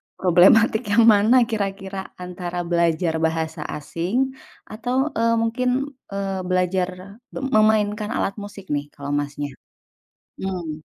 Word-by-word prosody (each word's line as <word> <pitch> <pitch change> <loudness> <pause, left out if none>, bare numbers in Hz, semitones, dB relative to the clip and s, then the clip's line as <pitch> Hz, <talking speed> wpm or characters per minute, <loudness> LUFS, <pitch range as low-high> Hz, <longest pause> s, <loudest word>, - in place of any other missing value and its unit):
problematik 205 +5 +4
yang 230 +2 +5
mana 215 +5 +4 0.2
kira-kira 195 -2 -3 0.2
antara 180 -1 -4
belajar 170 -1 +1
bahasa 160 0 -3
asing 170 +7 -4 0.6
atau, 245 +4 -3 0.2
eee, 230 0 +3
mungkin, 235 +2 0 0.5
eee, 195 -1 -2
belajar 185 0 +1 0.5
me - - -3 0.2
memainkan 210 -1 +2
alat 195 - -1
musik, 200 -4 -10
nih, 145 0 -1
kalo 140 0 -6
Masnya? 145 0 -4 0.9
Mhm. 175 -5 -4
190 Hz, 115 wpm, -22 LUFS, 170-210 Hz, 0.9 s, yang